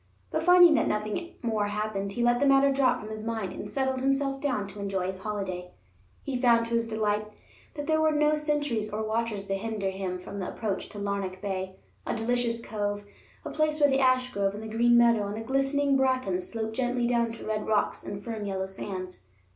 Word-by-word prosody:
But - - 0
finding 355 -2 +7
that 300 - +2
nothing 215 +11 -2
more 220 -3 0
happened, 205 -1 -2
he 240 - -1
let 240 0 +3
the 285 - +3
matter 275 0 +5
drop 270 -1 +2
from 215 - -8
his 215 0 -6
mind, 225 -4 -3
and 205 - -7
settled 265 +2 -1
himself 275 0 0
down 255 -8 0
to 205 - -10
enjoy 195 -2 -2
his 190 0 -4
holiday. 190 -3 -4 0.5
He 255 -3 -3
found 235 -2 +5
to 230 - -5
his 230 0 +1
delight 215 -1 0 0.5
that 290 -1 -4
there 315 0 +2
were 315 - +4
no 300 0 +3
sentries 295 -8 0
or 215 +1 -2
watchers 220 -2 -2
to 195 - -2
hinder 200 -1 -2
him 190 -1 -3
from 190 +2 -8
the 185 - -3
approach 210 -4 -3
to 210 - -10
Larnac 200 -2 -3
Bay, 190 -2 -4 0.3
a - - -2
delicious 235 0 0
cove, 205 -1 -3 0.4
a - - -4
place 310 0 +1
where 290 -1 +5
the 270 0 +2
ashgrove 255 -6 +2
and 210 - -7
the - - -6
green 240 +1 +5
meadow 235 -3 +4
and 205 +1 -4
the - - -4
glistening 275 +3 +1
bracken 255 -8 +1
sloped 220 +3 -4
gently 245 -1 0
down 235 -1 +1
to 230 - -9
red 215 -1 -2
rocks 215 -1 +1
and 200 0 -6
firm 220 -1 -4
yellow 190 -1 -2
sands. 190 -1 -6
225 Hz, 210 wpm, -28 LUFS, 200-260 Hz, 0.5 s, finding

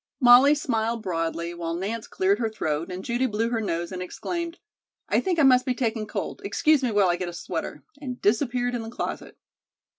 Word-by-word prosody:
Molly 255 +3 +7
smiled 230 -5 -1
broadly, 170 -1 -2
while 170 -1 -4
Nance 210 +6 -4
cleared 195 +2 +1
her 225 -2 0
throat 165 -5 -3
and 180 +1 -6
Judy 240 +2 0
blew 225 0 -1
her 230 -2 0
nose 170 -4 -2
and 185 -1 -5
exclaimed: 340 - -4 0.5
"I - - +2
think 370 -3 -1
I 315 - +4
must 255 -2 +6
be 255 -1 -1
taking 225 -4 -1
cold. - - -5
Excuse 310 -3 +2
me 255 - 0
while 205 -3 +3
I 175 - +1
get 180 -1 -3
a - - -8
sweater," 170 - -5 0.2
and 255 -3 -5
disappeared 245 +3 +1
in 240 - -2
the 225 - -7
closet. 235 - -5
225 Hz, 205 wpm, -25 LUFS, 185-250 Hz, 0.5 s, Molly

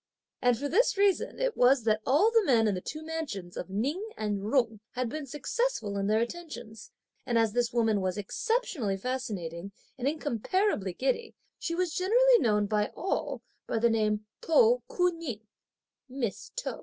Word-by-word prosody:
And 245 -2 +3
for 285 - -2
this 405 - +2
reason 400 -2 +2
it - - 0
was 250 0 +4
that 215 -1 +2
all 310 - +4
the 455 -1 +4
men 235 - +4
in 205 - +2
the 180 - -3
two 310 +9 -6
mansions 280 - -5
of 180 - -5
Ning 270 - -1
and 210 -2 -1
Jung 225 +1 +1
had 250 -1 -2
been 300 +2 -5
successful 295 - -2
in 200 0 -1
their 215 +2 +3
attentions; 235 -6 -6 0.3
and 240 -3 0
as 225 -2 +2
this 240 -1 +1
woman 225 -4 +2
was 185 0 -1
exceptionally 240 - -1
fascinating 200 -7 -4 0.3
and 255 - -1
incomparably 290 - 0
giddy, 270 - -1 0.2
she 335 - -2
was 355 -2 0
generally 480 +6 +5
known 210 - +2
by 210 0 +1
all 385 - -2 0.2
by - - -1
the 235 +1 +3
name 215 -1 +1 0.2
To 475 +8 +4
Ku 360 0 +2
Ning 315 -11 -6 0.7
(Miss 250 -5 -4
To). - - -4
245 Hz, 170 wpm, -29 LUFS, 215-335 Hz, 0.7 s, generally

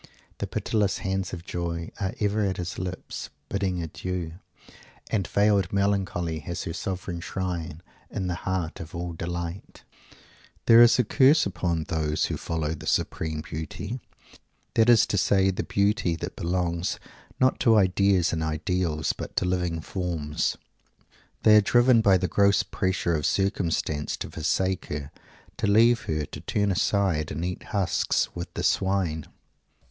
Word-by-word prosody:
The - - -2
pitiless 105 -3 0
hands 95 -1 -2
of 85 -2 -7
Joy 85 -2 -4
"are 100 +3 -2
ever 105 0 +1
at 95 -2 -1
his 90 -1 -4
lips, 90 0 -5 0.2
bidding 95 -3 -1
adieu" 85 +1 -4 0.8
and 100 -5 0
"veiled 100 -3 +2
melancholy 95 -5 0
has 85 +2 -5
her 85 - -4
'sovran 90 -1 -4
shrine' 85 -3 -4 0.3
in 95 - -3
the 90 - -1
heart 90 -2 -3
of 85 +1 -8
all 85 0 -4
delight." 85 +2 -6 0.8
This 115 +1 +8
is - - +3
the 125 - +4
curse 140 +6 +4
upon 85 -3 -1
those 80 -3 0
who - - -2
follow 80 -2 -2
the 80 - -8
supreme 80 -1 -1
Beauty 80 - -5 0.7
that 115 +1 +4
is 120 -3 +7
to 100 - 0
say, 95 +1 +3
the 95 - -3
Beauty 100 -3 +1
that 80 - -6
belongs, 85 0 -1 0.4
not 130 0 +3
to 115 -2 +5
ideas 95 -2 +3
and 80 - -1
ideals, 80 0 -1
but - - -8
to - - +1
living 90 -2 -1
forms. 80 -5 -2 0.9
They 105 -1 +8
are - - +7
driven 120 +2 +5
by 100 -3 +5
the 90 0 -1
gross 100 +1 +3
pressure 95 -2 -1
of 75 -3 +1
circumstance 85 -6 0
to - - -6
forsake 95 +4 -1
her, 75 0 -5 0.5
to - - 0
leave 115 +3 +4
her, 75 -1 -1
to - - -9
turn 100 -1 0
aside 95 -5 +1
and 80 +4 -3
eat 90 0 -4
husks 95 -5 0
with 85 +1 -6
the - - -3
swine! 95 -5 0
90 Hz, 155 wpm, -26 LUFS, 85-100 Hz, 0.9 s, This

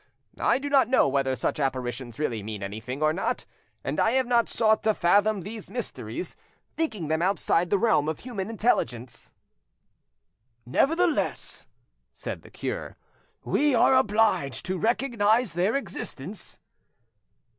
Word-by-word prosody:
I - - +3
do 280 +2 -4
not 275 -4 +4
know 260 - +4
whether 135 -1 +1
such 125 - -2
apparitions 125 -3 -3
really 120 -8 -1
mean 105 -1 -6
anything 110 +8 -5
or 155 0 +3
not, 185 - -2 0.4
and - - -2
I 225 - +3
have 260 0 +3
not 240 -1 +2
sought 220 -1 +2
to 215 -1 +2
fathom 205 +3 +3
these 210 +3 -8
mysteries, 180 - -5 0.4
thinking 220 - -2
them 160 +1 0
outside 175 -2 +1
the 200 - +3
realm 195 -8 +2
of 160 - -4
human 220 -5 -5
intelligence." 135 - -1 1.3
"Nevertheless," 325 - +1 0.5
said - - -6
the - - -15
cure, - - -5 0.5
"we 290 -3 +2
are 235 - +5
obliged 215 - +2
to 185 -1 -2
recognise 230 -2 +2
their 185 +7 +1
existence." 200 - -5
200 Hz, 135 wpm, -26 LUFS, -, 1.3 s, are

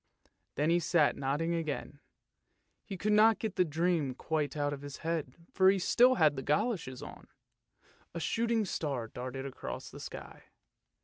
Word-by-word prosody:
Then 150 +4 +1
he 175 - +4
sat 165 -3 +3
nodding 145 +5 -1
again, 155 -3 -4 0.8
he 195 - -7
could 210 +3 +1
not 220 +1 +6
get 215 -4 -4
the 180 - +4
dream 160 -4 0
quite 150 0 -2
out 145 0 0
of 140 - -7
his 145 -1 -8
head, 160 -6 -2 0.2
for 190 0 +5
he 195 - +3
still 245 +7 +4
had 155 -4 +4
the 135 - -4
goloshes 150 - -1
on. - - -11 0.9
A - - -2
shooting 225 +6 0
star 140 -10 -3
darted 130 +3 -6
across 135 - -7
the - - -10
sky. - - -9
160 Hz, 165 wpm, -31 LUFS, 140-190 Hz, 0.9 s, not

